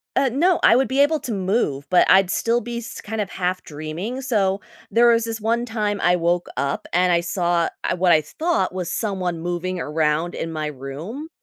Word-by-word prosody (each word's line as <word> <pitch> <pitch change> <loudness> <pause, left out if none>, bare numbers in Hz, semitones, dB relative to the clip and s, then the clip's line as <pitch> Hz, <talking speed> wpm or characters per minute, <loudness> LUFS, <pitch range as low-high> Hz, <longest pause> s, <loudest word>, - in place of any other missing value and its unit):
Uh, 270 - +3
no 345 +6 +3
I - - +7
would 265 +2 +3
be 265 +1 -1
able 305 +2 +3
to 245 - -5
move, 185 - -1
but 180 - +4
I'd 190 -1 +5
still 235 +1 +1
be 235 +1 -5
s 235 - -8
kind 220 0 -4
of 200 - -3
half 185 0 -2
dreaming, 160 - -5
so 200 -6 0 0.3
there 235 +1 +4
was 230 -1 +3
this 225 -1 -4
one 230 +2 0
time 210 -3 -2
I 175 +1 +4
woke 175 0 0
up, 140 +1 -2
and 180 +1 +3
I 170 - +4
saw 170 -1 0
ah, - - 0
what 180 0 +3
I 155 - +5
thought 310 - -1
was 180 -2 -3
someone 185 -6 -2
moving 175 +1 -3
around 155 +2 0
in 165 - -4
my 155 -1 -3
room, 150 - -7
185 Hz, 210 wpm, -22 LUFS, 170-230 Hz, 0.3 s, I